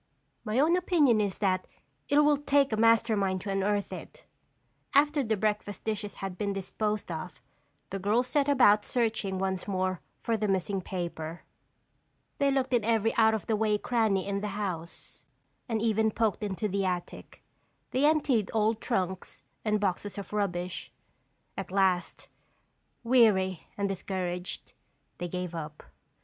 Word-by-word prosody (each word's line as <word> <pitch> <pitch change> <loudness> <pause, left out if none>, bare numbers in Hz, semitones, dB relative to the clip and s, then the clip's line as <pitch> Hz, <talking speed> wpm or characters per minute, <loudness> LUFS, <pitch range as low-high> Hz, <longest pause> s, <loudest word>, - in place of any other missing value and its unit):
My 215 0 -2
own 320 +5 +4
opinion 310 - +3
is 200 -2 -1
that 185 -2 0 0.4
it 285 - +3
will 295 -1 +4
take 280 -3 +2
a - - +3
master 230 0 +4
mind 190 -2 0
to 200 - -4
unearth 200 +1 0
it." - - -10 0.7
After 295 +1 +4
the 220 -4 0
breakfast 210 -1 -2
dishes 215 -1 -3
had 190 -2 -6
been 200 -1 -1
disposed 210 +1 -2
of, 165 +2 -6 0.5
the 195 - -3
girls 215 +6 +2
set 285 +2 +1
about 215 -7 +5
searching 220 -6 -1
once 190 0 -2
more 185 -3 -1 0.2
for 230 -1 +1
the 215 0 -1
missing 195 0 0
paper. 170 -3 -5 1.0
They 280 -1 +3
looked 265 -1 0
in 240 -3 +3
every 225 0 +2
out 220 -1 +5
of 220 - -4
the 225 - +1
way 210 -1 +2
cranny 220 -4 +1
in 200 0 -1
the 210 - -2
house 175 -5 -4 0.5
and 225 -2 0
even 220 -1 +3
poked 220 -2 0
into 205 +1 -1
the 200 0 -1
attic; 180 -1 -4 0.5
they 260 - +1
emptied 280 -9 +2
old 220 +1 +2
trunks 190 -6 -2 0.2
and 210 -1 +1
boxes 200 +1 -2
of 200 +1 -7
rubbish. 180 -3 -2 0.6
At 195 - -5
last, 190 -2 +1 0.8
weary 210 -7 +3
and 200 -1 0
discouraged, 185 -2 -4 0.5
they 175 - -2
gave 180 0 -4
up. 155 -2 -6
205 Hz, 155 wpm, -29 LUFS, 190-230 Hz, 1.0 s, about